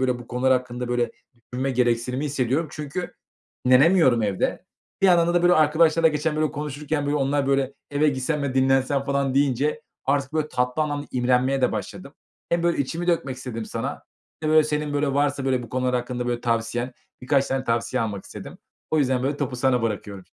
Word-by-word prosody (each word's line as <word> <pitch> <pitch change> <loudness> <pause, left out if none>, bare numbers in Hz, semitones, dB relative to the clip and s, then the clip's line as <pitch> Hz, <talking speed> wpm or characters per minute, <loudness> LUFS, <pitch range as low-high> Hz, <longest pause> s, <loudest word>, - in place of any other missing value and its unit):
böyle, 125 -2 +1
bu 120 - -11
konular 130 +1 +2
hakkında, 125 -1 -2
böyle, 120 -1 0 0.4
düşünme 130 +2 -1
gereksinimi 125 +2 0
hissediyorum. 140 +2 0
Çünkü 160 +3 -5 0.5
dinlenemiyorum 130 -2 +5
evde. 100 -3 -1 0.4
Bir - - +6
yandan 175 -1 +4
da, 175 - +3
böyle, 175 0 +5
arkadaşlarla 160 +1 +4
geçen, 150 0 -1
böyle, 155 -1 +1
konuşurken, 145 0 -3
böyle, 145 +1 +1
onlar, 140 0 0
böyle, 135 0 +1 0.2
eve 145 +2 +2
gitsem 140 +2 -1
ve 135 -2 -2
dinlensem 135 +1 +2
falan 140 -1 0
deyince 145 - +1 0.2
artık, 140 +1 0
böyle, 155 -1 -1
tatlı 125 +4 0
anlamda 145 -1 -3
imrenmeye 130 +2 +2
de - - +3
başladım. - - -6 0.3
Hem, 170 0 +1
böyle, 170 0 +1
içimi 165 +6 -2
dökmek 140 -7 0
istedim 125 -3 -6
sana. 115 +6 -5 0.4
İşte, 155 - 0
böyle, 155 0 +7
senin, 150 -1 -2
böyle, 145 -1 0
varsa, 140 -1 +1
böyle, 130 -2 +1
bu 115 - -10
konular 125 0 -1
hakkında, 125 0 -2
böyle, 120 -1 -1
tavsiyen 120 +1 -1 0.3
birkaç 135 +1 +2
tane 135 0 -2
tavsiye 120 +2 0
almak 100 -3 -4
istedim. - - -10 0.3
O 155 - +2
yüzden, 130 -3 +1
böyle, 140 +2 -1
topu 130 -4 -3
sana 125 -1 +2
bırakıyorum. 100 -4 -4
135 Hz, 185 wpm, -24 LUFS, 125-150 Hz, 0.5 s, böyle